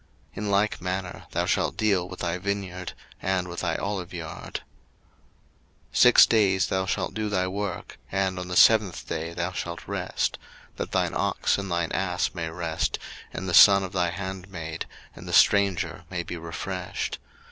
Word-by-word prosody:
In 105 0 -3
like 100 0 +1
manner 90 0 -4
thou - - -1
shalt - - 0
deal 100 -5 +1
with 95 - -8
thy 90 +1 -1
vineyard, 95 -2 -3 0.3
and 95 -1 0
with 85 -1 -6
thy 85 -3 -1
oliveyard. 90 -5 -5
02:023:012 - - -3 1.3
Six 125 -1 +8
days 100 -4 +3
thou 95 0 0
shalt - - -1
do 110 -1 -2
thy 95 -3 +1
work, 95 -1 -4
and 95 -1 0
on 90 - -5
the 90 - -4
seventh 105 -6 +5
day 80 +1 -3
thou 85 +1 -2
shalt 85 -1 -5
rest: - - -2 0.4
that - - -4
thine - - +1
ox - - +1
and 100 0 -4
thine 85 -1 -1
ass 90 -2 0
may 85 -2 -3
rest, 80 -1 -2 0.3
and 95 - -5
the 90 - -2
son 100 +2 +9
of 95 - -5
thy 90 -3 +1
handmaid, 90 -3 -5 0.3
and - - -11
the - - -5
stranger, 100 -3 +3
may 90 -2 -3
be 90 - -6
refreshed. 90 +2 -4
90 Hz, 170 wpm, -26 LUFS, 85-100 Hz, 1.3 s, son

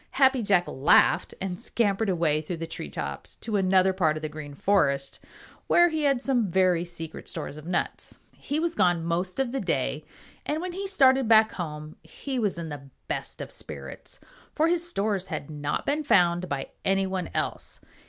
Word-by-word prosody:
Happy 265 -2 +5
Jack 195 -4 +3
laughed 135 +4 +3
and 185 -2 -4
scampered 210 -2 0
away 165 -4 +1
through 165 +3 -5
the 165 - -4
tree 75 - -7
tops 70 0 -6
to 220 -2 -4
another 190 -1 +3
part 160 -5 +1
of 155 - -8
the 155 - -2
Green 150 -2 -8
Forest 140 -7 +1 0.5
where 345 0 +5
he 315 -2 -1
had 275 -3 +3
some 245 -6 +1
very 180 -1 +3
secret 170 -2 -7
stores - - -5
of 155 +1 -10
nuts. 175 -1 -2 0.2
He 290 +2 -3
was 335 +1 0
gone 175 - +2
most 180 +5 -1
of 265 -3 0
the 270 - -2
day, - - -1 0.4
and 305 - -2
when 360 +2 -4
he 390 +3 -4
started 265 - +4
back 220 -1 +6
home 155 -3 -6
he 255 - -5
was 205 -6 0
in 165 -1 -5
the 140 -2 -8 0.2
best - - -4
of - - -7
spirits, - - -7 0.4
for 320 +1 +3
his 345 0 +2
stores 200 - -1
had 155 -3 -5
not 145 -1 -3
been 295 +2 0
found 180 - +3
by 135 -1 -3
any 195 0 +2
one 190 -2 -3
else. - - -2
185 Hz, 190 wpm, -26 LUFS, 160-250 Hz, 0.5 s, back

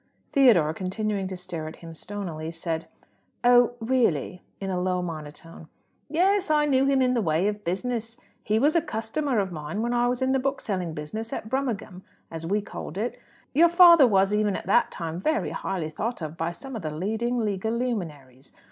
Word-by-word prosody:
Theodore, 210 - +5
continuing 195 +2 -2
to 185 -1 -6
stare 175 -3 -6
at 155 - -8
him 165 -1 -11
stonily, 165 -3 -5
said, 165 -1 -4 0.6
"Oh, 245 0 +5
really?" 225 - 0 0.2
in 195 -1 -3
a 180 -1 -1
low 180 0 0
monotone. 160 0 -8 0.4
"Yes; 375 +4 +2
I 300 -1 +4
knew 270 -2 +3
him 270 -1 +3
in 250 0 +2
the 240 - +1
way 165 +1 +1
of 210 0 -3
business. 230 +5 -3 0.2
He 215 +1 0
was 290 +7 +3
a 335 - +5
customer 245 +3 -2
of 195 -3 0
mine 155 +6 -4
when 240 +1 0
I 240 0 +2
was 250 +1 0
in 260 - +2
the 265 - +2
bookselling 200 - -2
business 215 +10 -5
at 220 - -5
Brummagem, 230 -8 -3 0.3
as 165 0 -6
we 205 +4 +1
called 190 -3 -8
it. 230 +4 -3 0.3
Your 335 +5 +6
father 340 -5 +8
was, 195 -2 +3
even 210 -2 +1
at - - -5
that - - +3
time, 165 -1 -5
very 310 +11 0
highly 175 -5 -3
thought 230 +9 -3
of 155 +1 -5
by 165 +1 -2
some 265 +8 -9
of 220 - -4
the 155 - -3
leading 220 +10 -2
legal 215 -1 -1
luminaries. 155 - -4
210 Hz, 190 wpm, -26 LUFS, 170-245 Hz, 0.6 s, father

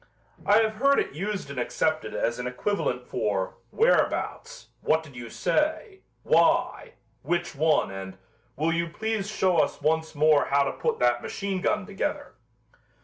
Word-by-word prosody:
I 205 - +6
have 220 -1 -1
heard 275 +4 +4
it - - -2
used 195 -2 -4
and 135 - -5
accepted 155 +5 -1
as 120 +1 -1
an 125 - -3
equivalent 125 -2 -2
for 100 -3 -2
"whereabouts," - - 0
"what 160 +1 +2
did 140 -5 -14
you 120 -1 -8
say," 315 - -1 0.2
"why," - - +2 0.3
"which 175 0 -1
one" 155 -5 +2
and 95 -1 -7 0.4
"will 160 +4 0
you 170 0 0
please 220 +2 -3
show 185 -4 +1
us - - +1
once 160 +2 0
more 150 0 +4
how 140 0 +3
to 140 - -1
put - - -2
that 120 0 +3
machine 195 -2 -3
gun 200 - 0
together." 200 -1 -4
160 Hz, 155 wpm, -26 LUFS, 125-205 Hz, 0.4 s, I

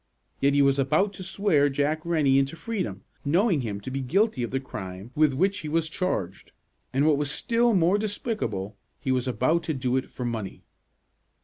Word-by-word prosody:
Yet 140 +1 +3
he 145 - +5
was 140 0 +3
about 155 +10 +2
to 185 - -7
swear 190 -6 +2
Jack 145 +3 0
Rennie 150 -5 +3
into 135 +3 -1
freedom, 210 0 -4 0.2
knowing 170 - +2
him 105 -4 -4
to 130 - -6
be 135 +1 -2
guilty 180 - +1
of 120 - -2
the 135 - -1
crime 95 -4 -8
with 155 -1 +4
which 190 +8 +1
he 155 - -5
was 160 +1 0
charged, 100 - -3 0.4
and, 135 +3 +2
what 155 -2 +4
was 145 0 -1
still 235 - +2
more 180 +3 +3
despicable, 200 - -3 0.2
he 130 - -2
was 130 0 0
about 130 +7 +1
to 160 - -1
do 130 -1 0
it 130 - -3
for 125 - -6
money. 110 -5 -4
145 Hz, 195 wpm, -26 LUFS, 130-180 Hz, 0.4 s, he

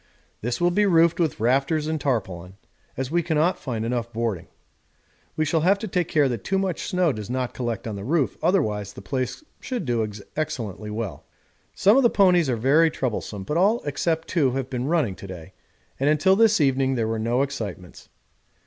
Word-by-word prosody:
This 120 +2 -2
will 175 0 +3
be 205 +3 +2
roofed 170 -2 +4
with 160 -9 0
rafters 135 +7 +1
and 155 -1 -2
tarpaulin, 95 -8 -2 0.4
as 130 +1 -3
we 175 +1 +2
cannot 160 +2 +1
find 115 -4 -3
enough 120 0 -2
boarding. 110 -7 -3 0.9
We 155 - +1
shall 160 +2 +1
have 190 +5 +4
to 220 - -5
take 180 -3 0
care 150 -4 +3
that 120 -5 -3
too 195 - 0
much 190 -3 -2
snow 180 -3 +2
does 105 -1 -7
not 125 0 -2
collect 120 -3 -3
on 110 - -4
the 100 - -6
roof, 145 +3 0
otherwise 105 - 0
the 100 - -11
place 130 - -3 0.2
should 250 -3 -4
do 120 -3 0 0.3
excellently 110 - -4
well. 105 -3 -5 0.5
Some 205 +6 +5
of - - +6
the 240 - +5
ponies 180 -8 +4
are 125 - +1
very 145 +8 +4
troublesome, 110 -8 -4
but 150 +11 -2
all 205 +6 +3
except 160 +3 -1
two 140 -8 +1
have 135 0 -3
been 125 0 -2
running 155 - +1
to 100 - -9
day, 90 -1 -10 0.5
and 140 +2 +2
until 170 +6 +4
this 220 -1 +4
evening 135 -2 +2
there 115 -3 0
were 110 0 -2
no 120 +4 +1
excitements. 105 -10 -7
135 Hz, 195 wpm, -24 LUFS, 115-170 Hz, 0.9 s, of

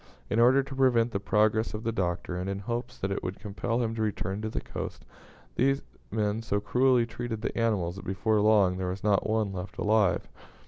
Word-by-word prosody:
In 110 - +2
order 130 +3 +6
to 135 0 -8
prevent 120 -3 +3
the 100 - -1
progress 110 +2 +2
of 105 - -6
the 115 - 0
Doctor, 90 -3 -2
and 90 +2 -3
in 100 - -2
hopes 120 +4 -4
that 95 - -2
it 100 - -2
would 90 +2 -4
compel 115 +4 -2
him 115 -1 -1
to 115 - -3
return 100 -1 -2
to 110 - -2
the - - -3
coast, - - -7 0.5
these 135 +2 +2 0.3
men 105 +1 0
so 100 -2 0
cruelly 125 +3 +3
treated 115 -1 -5
the - - -2
animals 100 -6 0
that 95 - -9
before 105 +3 +1
long 100 -4 +4
there 95 -1 -2
was 95 +2 -5
not 105 0 +2
one 110 -2 +1
left 90 +1 -6
alive. 105 -2 +2
110 Hz, 215 wpm, -28 LUFS, 100-115 Hz, 0.5 s, order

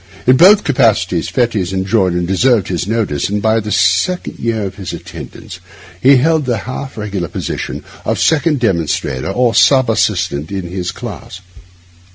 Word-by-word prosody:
In 125 - +5
both 195 +8 +6
capacities 105 - +1
Fettes 110 -7 0
enjoyed 95 0 +1
and 90 0 -1
deserved 110 +3 +2
his 90 0 -2
notice, 105 -10 -1
and 105 +1 -1
by 110 +2 +2
the 105 -1 -5
second 95 - +1
year 115 -2 -1
of 95 -1 -4
his 95 -3 -6
attendance - - -10 0.4
he 135 +2 +6
held 155 +2 +2
the 120 -3 0
half 130 +1 -6
regular 100 -5 -3
position - - -5 0.2
of - - -1
second 160 -2 +2
demonstrator 85 - -1
or 120 +3 +1
sub 130 -3 +4
assistant 80 -8 -1
in 95 -2 -3
his 90 +1 -4
class. 95 - -9
105 Hz, 160 wpm, -15 LUFS, 95-125 Hz, 0.4 s, both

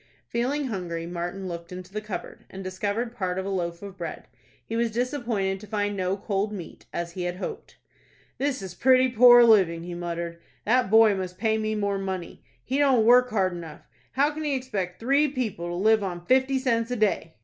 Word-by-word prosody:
Feeling 265 +5 -1
hungry, 175 -8 -4
Martin 175 +2 -4
looked 170 -1 -7
into 185 +1 -9
the 215 - -3
cupboard, 210 -3 -7
and 195 0 -8
discovered 205 +5 -2
part 185 -5 -2
of 190 - -2
a - - -3
loaf 170 -1 -3
of 195 -1 -9
bread. - - -6 0.4
He 225 - -5
was 235 0 +1
disappointed 230 -5 -1
to 210 - -12
find 205 0 -1
no 185 0 -1
cold 200 +1 -1
meat, 185 -6 -9
as 170 0 -4
he 180 0 -4
had 175 0 -2
hoped. 185 - -7 0.6
"This 270 -6 -1
is 185 -2 -6
pretty 255 +6 +4
poor 240 0 +8
living," 185 -8 +4
he 175 0 -6
muttered. 170 -1 -4 0.3
"That 245 -1 +3
boy 220 0 +6
must 185 -2 -4
pay 220 -1 +1
me 215 0 -1
more 200 -1 -1
money. 190 -2 -5 0.2
He 265 +3 -1
don't 265 -6 +4
work 250 +2 +6
hard 190 -5 +1
enough. 165 -3 -8 0.3
How 285 +3 +3
can 310 +1 -6
he 290 -2 0
expect 200 -9 -4
three 275 +6 +3
people 235 -11 -3
to 175 - -4
live 215 +4 +3
on 175 -2 -5
fifty 260 +3 +3
cents 230 -3 0
a 250 - -1
day?" 205 -7 0
205 Hz, 205 wpm, -26 LUFS, 180-240 Hz, 0.6 s, poor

